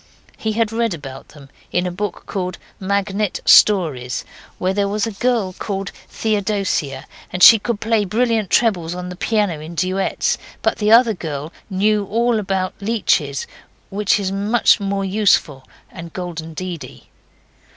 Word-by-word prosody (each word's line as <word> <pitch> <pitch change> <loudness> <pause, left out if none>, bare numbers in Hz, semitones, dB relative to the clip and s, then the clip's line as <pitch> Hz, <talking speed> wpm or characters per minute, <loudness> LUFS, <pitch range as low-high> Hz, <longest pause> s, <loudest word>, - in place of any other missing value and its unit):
He 220 -1 -3
had 225 0 0
read 230 -4 0
about 135 -3 -10
them 140 -2 -16 0.2
in 180 +1 0
a 180 - -2
book 200 +2 -4
called 185 -3 -4 0.2
Magnet 200 +1 -1
Stories, 150 -12 +4 0.3
where 185 +1 0
there 200 0 +1
was 210 +2 -1
a 225 - -3
girl 220 -3 0
called 195 0 -4 0.2
Theodosia, 200 -8 -1 0.3
and 180 - 0
she 225 - +10
could 230 0 -3
play 225 -1 +1
brilliant 220 0 0
trebles 180 -8 +1
on 180 0 -6
the 180 - -7
piano 205 -4 0
in 160 +3 -9
duets, 185 +3 0 0.2
but - - 0
the 210 -1 +1
other 230 0 +6
girl 155 -3 -6 0.2
knew 205 +2 +1
all 230 +3 +1
about 190 -2 -2
leeches 185 -10 0 0.5
which 205 +1 +1
is 190 -1 -2
much 210 +5 +3
more 200 -1 -2
useful 185 -9 +1 0.2
and 170 -2 -9
golden 165 -3 -6
deedy. 180 -1 -7
195 Hz, 150 wpm, -19 LUFS, 175-215 Hz, 0.5 s, she